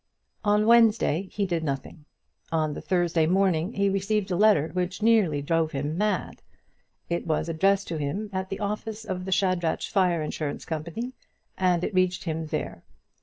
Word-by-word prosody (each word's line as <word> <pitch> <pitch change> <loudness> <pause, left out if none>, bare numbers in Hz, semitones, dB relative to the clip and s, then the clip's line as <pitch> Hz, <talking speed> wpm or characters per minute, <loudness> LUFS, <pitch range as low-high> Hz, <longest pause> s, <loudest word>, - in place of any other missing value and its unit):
On 210 0 +3
Wednesday 220 -6 +4
he 205 - -1
did 170 -3 -1
nothing. 140 +1 -5 0.5
On 155 -2 0
the - - -6
Thursday 175 -3 +1
morning 185 +1 +2
he 200 0 +1
received 195 +1 0
a - - +1
letter 200 -6 +4
which 180 +3 -2
nearly 200 -11 +3
drove 165 +1 0
him 145 +3 -2
mad. 205 -1 -1 0.7
It 170 0 -2
was 155 0 0
addressed 195 +4 +2
to 165 - -2
him 155 +9 -3
at 190 0 -3
the 195 - -4
office 215 +1 -4
of 185 -3 -4
the 190 - -4
Shadrach 185 -3 +1
Fire 180 -5 +1
Insurance 150 -1 -4
Company, 170 +11 -4 0.4
and 180 -2 +1
it 210 - -2
reached 185 -1 +1
him 160 -1 -3
there. 155 0 -4
180 Hz, 170 wpm, -26 LUFS, 160-200 Hz, 0.7 s, Wednesday